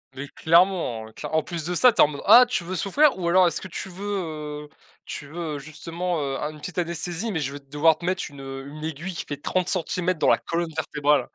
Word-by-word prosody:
Mais 135 +2 -6
clairement, 165 -10 +2
claire - - -7
en 160 - +3
plus 165 0 -5
de 180 - -2
ça 250 +7 +6
tu 225 - +3
es - - +10
en - - +5
mode 145 -1 -7
«Ah 235 +5 +9
tu 245 - -1
veux 185 +2 -5
souffrir 265 - +3
ou 175 - -2
alors 180 +1 +5
est-ce - - -1
que 190 - -7
tu 190 +3 -6
veux, 160 -6 -5
heu - - -29 0.4
tu - - -7
veux 160 -1 -5
justement, 165 +4 -4
heu, 135 -1 -2
un 150 - -3
une 150 - -13
petite 180 +4 -8
anesthésie, 175 +4 -2
mais 160 - -1
je 140 -2 -3
vais 145 - -7
devoir 150 +3 +2
te 170 - -8
mettre 185 0 0
un - - -14 0.3
une 150 +2 -9
aiguille 160 +4 -5
qui - - -5
fait 145 - -5
30cm 180 +1 0
dans - - +3
la - - +5
colonne 170 0 -3
vertébrale?» 150 -2 +1
165 Hz, 245 wpm, -24 LUFS, 150-180 Hz, 0.4 s, es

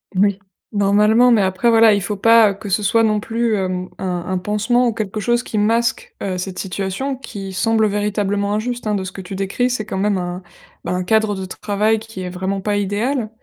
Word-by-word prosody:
Oui, 200 +1 +2 0.3
normalement, 210 +4 +4
mais 225 -3 +4
après, 190 +5 +1
voilà, 225 -1 +6
il 200 - +1
faut 200 +3 -3
pas, 225 +1 +6
heu, - - -4
que 200 +1 -10
ce 200 +2 0
soit 225 +3 +3
non 215 -1 +1
plus, 230 0 0
hem, 185 -2 -2
un 180 -2 -3
un 185 0 -1
pansement 215 +6 +1
ou 230 - 0
quelque 215 -1 -4
chose 240 +3 +1
qui 225 - -5
masque, 230 +3 0
heu, 185 -2 -2
cette 185 0 -5
situation, 195 +8 -3
qui 195 -7 -8
semble 220 +2 +2
véritablement 205 0 -1
injuste, 240 +1 -3
hein, 210 - +1
de 190 -2 -2
ce 185 - -7
que 195 - -7
tu 190 +1 -7
décris. 195 +6 -1
C'est 245 -4 -2
quand 190 - -4
même 200 0 +1
un 180 0 -4 0.4
bah, - - -3
un 180 0 -1
cadre 220 +1 +2
de 190 -1 -5
travail 210 +3 0
qui 225 -3 -9
est 180 - -4
vraiment 190 +2 -3
pas 205 +2 -1
idéal 215 +5 -1
205 Hz, 225 wpm, -19 LUFS, 190-225 Hz, 0.4 s, voilà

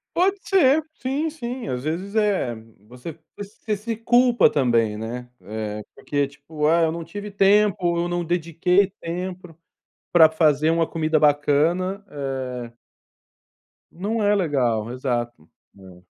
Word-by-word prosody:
Pode 385 +3 +2
ser. 315 -6 +4
Sim, 285 +3 -2
sim. 255 -5 -6
Às 125 -1 -3
vezes, 185 +7 -4
eh, 200 - +1 0.3
você 125 +7 -10 0.2
você 210 +1 -5
se 220 +2 -5
culpa 240 +1 +4
também, 115 -6 +1
né. 120 +3 -6
É, 105 +2 -5
porque 145 -1 -1
tipo: 150 +2 -4
"Ah, 165 +2 +4
eu 160 - +2
não 170 0 -5
tive 205 +5 -7
tempo, 195 -3 +3
eu 170 - 0
não 175 0 -2
dediquei 175 +3 +1
tempo 180 0 -6 0.5
pra 160 -2 +7
fazer 155 -1 +2
uma 165 0 +2
comida 155 -1 0
bacana, 155 +7 +2
eh" 130 -4 -5 1.2
Não 210 +6 -3
é 205 0 +3
legal 125 - 0
exato. 120 - -3 0.2
Não. 95 -2 -16
165 Hz, 135 wpm, -23 LUFS, 130-200 Hz, 1.2 s, pra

